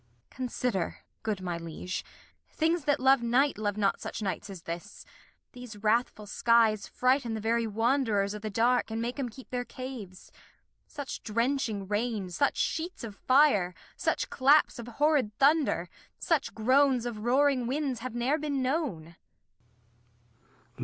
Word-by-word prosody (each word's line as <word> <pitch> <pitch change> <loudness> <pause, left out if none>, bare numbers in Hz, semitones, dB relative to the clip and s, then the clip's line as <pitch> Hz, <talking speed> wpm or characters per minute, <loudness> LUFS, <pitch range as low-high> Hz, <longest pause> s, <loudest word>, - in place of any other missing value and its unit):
Consider, 245 -7 -2 0.2
good 215 -3 -2
my 175 -2 -3
Liege, 165 +2 -5 0.5
Things 325 -1 0
that 290 0 +2
love 265 0 +5
Night, 245 +2 +2
Love 205 -1 -1
not 200 -2 +1
such - - -5
Nights 190 0 -3
as 185 -4 -9
this; 170 +1 -7 0.5
these 245 -3 -10
wrathf 215 +3 +1
ull 210 - -8
Skies 225 -1 +3
Frighten 255 -2 +1
the - - -3
very 230 +1 0
Wanderers 225 -2 +1
o' 210 - -5
th' 215 0 -5
Dark, 235 +3 +2
And 220 0 -3
make 240 +4 -3
'em 255 -3 -2
keep 255 +3 -14
their 250 -1 -1
Caves; 245 -8 -9 0.6
such 285 -3 -6
drenching 230 -3 -1
Rain, 210 -2 -2
Such 280 +11 +1
Sheets 340 +1 -2
of 215 -3 -7
Fire, 255 - +3 0.2
such - - -1
Claps 275 0 +4
of 235 - -7
horrid 270 -4 +1
Thunder, 280 - +3 0.3
Such 320 -5 0
Groans 255 +2 +3
of 235 -3 -4
roaring 255 +2 +2
Winds 270 -2 -1
have 245 0 -6
ne're 260 +6 +1
been 285 -3 -1
known. 250 - -2
235 Hz, 150 wpm, -29 LUFS, 210-270 Hz, 0.6 s, love